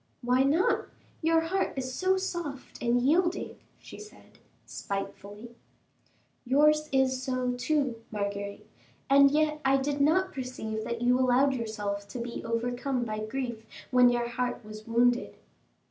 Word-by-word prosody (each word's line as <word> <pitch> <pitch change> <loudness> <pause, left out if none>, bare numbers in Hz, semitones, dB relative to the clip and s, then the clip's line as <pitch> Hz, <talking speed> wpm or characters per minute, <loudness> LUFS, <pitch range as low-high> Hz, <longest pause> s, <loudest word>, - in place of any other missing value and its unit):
"Why 250 +2 +3
not? 295 +7 +2 0.3
Your 325 0 +3
heart 370 +4 -1
is 260 -1 -4
so 375 +5 +1
soft 345 -8 -5
and 240 0 +2
yielding," 345 +6 +1 0.2
she - - -12
said, 425 0 -15 0.3
spitefully. 205 +3 -6 0.9
"Yours 300 +4 +3
is 260 -1 +2
so, 255 -1 -1
too, 250 0 0
Marguerite, 200 -1 -4 0.5
and 280 0 +7
yet 305 +1 +1
I 270 0 +4
did 280 +1 -1
not 370 +6 +2
perceive 235 -5 -5
that 235 0 -3
you 250 +1 +3
allowed 260 +2 +3
yourself 205 -4 -4
to 205 - -8
be 235 0 -5
overcome 245 +3 -1
by 215 -1 -4
grief 235 0 -4 0.3
when 250 -1 +6
your 240 0 0
heart 245 -1 -3
was 215 +1 -10
wounded." 240 +1 +2
255 Hz, 140 wpm, -28 LUFS, 235-285 Hz, 0.9 s, and